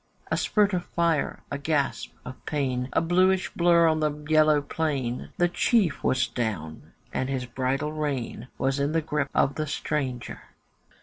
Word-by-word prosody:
A - - +3
spurt 205 -2 +2
of 180 -1 0
fire, 170 -3 0
a 140 - -2
gasp 145 -1 -1
of 130 - -9
pain, 130 -4 -1
A - - +2
blueish 185 +2 +2
blurr 170 -1 +5
on 160 -1 +2
the 155 -1 +2
yellow 155 0 +3
plain, 140 -5 -2
The 175 - +4
chief 180 -2 +1
was 130 -1 +2
down, 100 -12 -4 0.2
and 130 - -1
his 130 -2 -2
bridle 130 +4 -1
rein 135 -6 -3
Was 135 +1 0
in 140 +2 0
the 165 - +2
grip 150 -2 -1
of 140 - +3
the 155 +1 -3
stranger. 140 -4 -3
150 Hz, 165 wpm, -26 LUFS, 130-160 Hz, 0.2 s, blurr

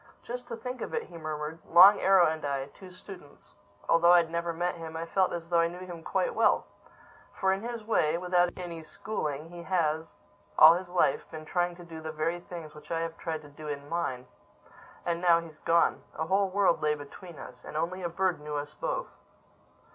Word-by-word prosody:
"Just 245 +1 -6
to 230 - -5
think 250 +1 -6
of - - -4
it!" - - -1
he 175 - -14
murmured. 155 0 -4
"Long 190 +5 +8
Arrow 190 -2 +6
and 155 -1 -1
I, 140 -2 -1
two 190 - -12
students—Although 175 -1 -1
I'd 170 -2 +4
never 170 0 -1
met 175 +2 -1
him, 160 -1 -7
I 165 - -3
felt 185 +2 +1
as 170 -1 -5
though 170 -1 +3
I 170 - +4
knew 175 +2 -8
him 175 -2 -8
quite 485 - -1
well. - - +3 0.7
For, 190 0 +1
in 195 - -3
his 235 -1 -5
way—without 180 -3 +2
any 170 -3 -6
schooling—he 165 -2 -5
has, 165 -3 -1 0.4
all 160 +1 +10
his 180 +1 -4
life, 180 0 +1
been 155 -1 -8
trying 175 +1 0
to 175 - -12
do 165 -2 -9
the 160 0 -5
very 160 +3 -1
things 170 -3 -9
which 150 0 -14
I 165 -1 -1
have 165 0 -3
tried 160 -2 -4
to 145 - -13
do 150 +1 -10
in 145 -1 -5
mine—And 170 +2 -6
now 170 -2 +5
he's 160 -2 -11
gone!—A 165 -1 +1
whole 195 +3 +2
world 195 -2 +2
lay 150 0 +2
between 155 +4 -11
us—And 125 +3 -9
only 180 +4 -2
a 175 - -2
bird 180 -1 0
knew 150 0 -5
us 145 0 -4
both!" - - -3
170 Hz, 195 wpm, -29 LUFS, 155-180 Hz, 0.7 s, all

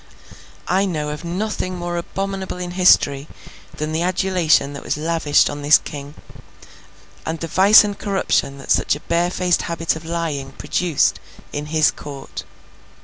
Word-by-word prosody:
I 190 +2 +2
know 155 -5 -2
of 150 +2 -6
nothing 185 +1 -3
more 175 0 -4
abominable 190 +2 -4
in 180 -1 -5
history 155 -6 +3 0.5
than 155 +1 -3
the 160 +1 -1
adulation 180 -5 +2
that 140 - -7
was - - -2
lavished 160 -1 +2
on 145 0 -5
this 145 +1 +6
King, 145 -1 -9 1.1
and 160 0 -4
the - - -3
vice 190 +7 +6
and 205 -1 -3
corruption 195 -9 -1
that 135 - -6
such - - +3
a - - -8
barefaced 175 +1 +1
habit 165 -1 -1
of 160 - -8
lying 160 -5 -3
produced 175 -5 0 0.3
in 145 +1 -4
his 155 0 +3
court. 140 -2 -9
170 Hz, 150 wpm, -20 LUFS, 150-180 Hz, 1.1 s, this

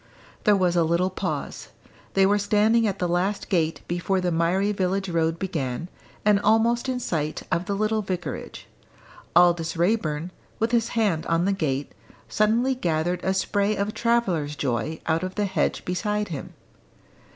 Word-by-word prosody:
There 210 -2 +6
was 180 -2 +2
a 170 - +4
little 170 +3 +1
pause. - - -4 0.5
They 195 0 +5
were 205 +1 +3
standing 215 +3 +3
at 200 -1 -2
the 180 - -1
last 180 +4 -1
gate 165 -3 0
before 175 +2 0
the 180 -1 0
miry 175 +5 +1
village 195 0 -1
road 165 -1 +1
began, 165 -4 -3 0.4
and 210 -1 +5
almost 230 +4 +2
in 255 -1 -1
sight 155 -9 -2
of 170 - 0
the 200 +1 -2
little 215 +1 +1
vicarage. 185 -3 -5 0.7
Aldous 170 -2 +4
Raeburn, 170 -3 0 0.3
with 225 +1 0
his 235 -2 +2
hand 200 -8 +1
on 165 +1 +2
the 200 - +2
gate, 145 -7 -2 0.4
suddenly 230 +5 +2
gathered 175 -5 -1
a 190 0 +1
spray 205 +2 +1
of 205 +1 -2
travellers' 190 -11 0
joy 140 +3 -2
out 160 0 +1
of 185 0 -4
the 205 - 0
hedge 190 -1 -1
beside 210 +3 -1
him. 150 -5 -7
185 Hz, 160 wpm, -25 LUFS, 170-210 Hz, 0.7 s, There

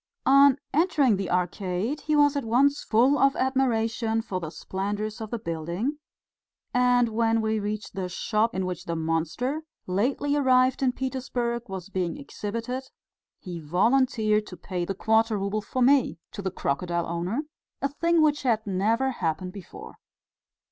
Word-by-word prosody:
On 275 0 +6 0.2
entering 290 - +3
the 195 -1 -3
Arcade 180 - -1
he 305 - 0
was 290 -1 +4
at 280 - -1
once 270 +6 +2
full 250 +6 +3
of 275 0 +4
admiration 230 -4 0
for 185 -5 -3
the 165 -3 -5
splendours 205 +5 -4
of 220 - -5
the 235 - -2
building, 175 - -3 0.7
and 245 -1 +3
when 225 0 +1
we 220 0 0
reached 210 0 -4
the 185 -1 -3
shop 215 +4 0
in 190 0 -1
which 180 -1 -5
the 170 - -2
monster 165 - -1 0.2
lately 255 +10 0
arrived 260 -2 +3
in 260 -2 +3
Petersburg 245 -3 -3
was 190 0 -6
being 185 +2 -2
exhibited, 250 -1 -5 0.5
he 175 -2 -7
volunteered 215 - +2
to 180 - -9
pay 180 -3 -4
the 195 - -3
quarter 220 +1 +2
rouble 200 +2 -1
for 255 +4 -1
me 270 +1 +4
to 200 - -6
the 190 - -1
crocodile 170 +2 -2
owner 175 - -2 0.4
a 275 - +1
thing 335 +3 +2
which 295 -1 +2
had 225 -4 +1
never 220 +7 +1
happened 180 -4 -3
before. 200 -4 -11
225 Hz, 155 wpm, -26 LUFS, 190-260 Hz, 0.7 s, On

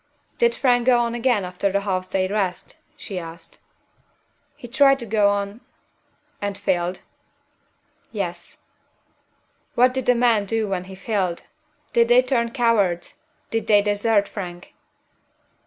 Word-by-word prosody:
"Did 475 0 +3
Frank 245 -2 +2
go 250 -1 +6
on 235 -1 0
again 235 -4 +1
after 180 +2 -1
the 200 +1 0
half 185 -2 -2
day's 185 0 0
rest?" 195 -4 -2 0.2
she 190 -3 -6
asked. 165 0 -10 1.0
"He 285 -4 -11
tried 275 +2 +4
to 240 - -6
go 210 -2 +3
on 200 +3 -3 0.4
" - - -42
"And 200 -1 -3
failed?" 180 -1 -1 1.1
"Yes." 175 -5 -5 1.2
"What 250 +1 +4
did 260 -1 -3
the 250 - +5
men 235 -4 +3
do 220 +1 -1
when 185 -2 -3
he 190 0 -10
failed? 190 -4 -2 0.5
Did 235 0 +4
they 245 +1 +5
turn 240 -2 0
cowards? 215 -8 0 0.3
Did 225 -1 -2
they 205 -2 +5
desert 205 0 +1
Frank?" 175 -3 -8
205 Hz, 140 wpm, -22 LUFS, 185-235 Hz, 1.2 s, go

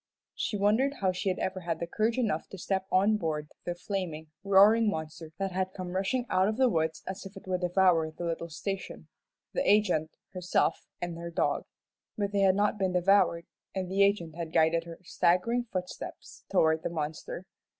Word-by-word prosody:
She 210 - -2
wondered 220 +8 +2
how 190 -6 +1
she 185 +2 -2
had 185 - -1
ever 185 0 -2
had 170 -2 -2
courage 225 +2 +1
enough 210 -11 -1
to 195 - -9
step 190 +1 -2
on 200 +3 +4
board 155 -5 -3
the 175 - -2
flaming, 175 -4 -4
roaring 205 +3 +6
monster 160 -2 -5
that 195 -1 -2
had 185 0 -2
come 185 -1 -5
rushing 195 +7 0
out 185 +1 +2
of 215 +1 -1
the 260 -1 +4
woods 160 -4 -1
as 190 +1 -5
if 195 +1 -13
it - - -11
would 185 -1 -1
devour 180 -3 +3
the 160 +2 -8
little 170 0 -3
station, 195 +4 -5 0.4
the - - 0
agent, 180 - +2 0.2
herself, 180 -1 0 0.2
and 170 -1 -4
her 170 0 -5
dog. 170 - 0 0.5
But 205 -1 -1
they 200 - 0
had 190 -1 +5
not 205 +1 +1
been 190 -2 +1
devoured, 180 -2 +3 0.3
and 185 -1 -3
the 195 +1 +2
agent 200 -5 +2
had 165 -2 -5
guided 165 +1 +3
her 170 -1 -9
staggering 210 +9 +1
footsteps 180 -1 -6
toward 160 -4 +3
the - - -2
monster. 160 +2 -5
185 Hz, 190 wpm, -29 LUFS, 170-200 Hz, 0.5 s, roaring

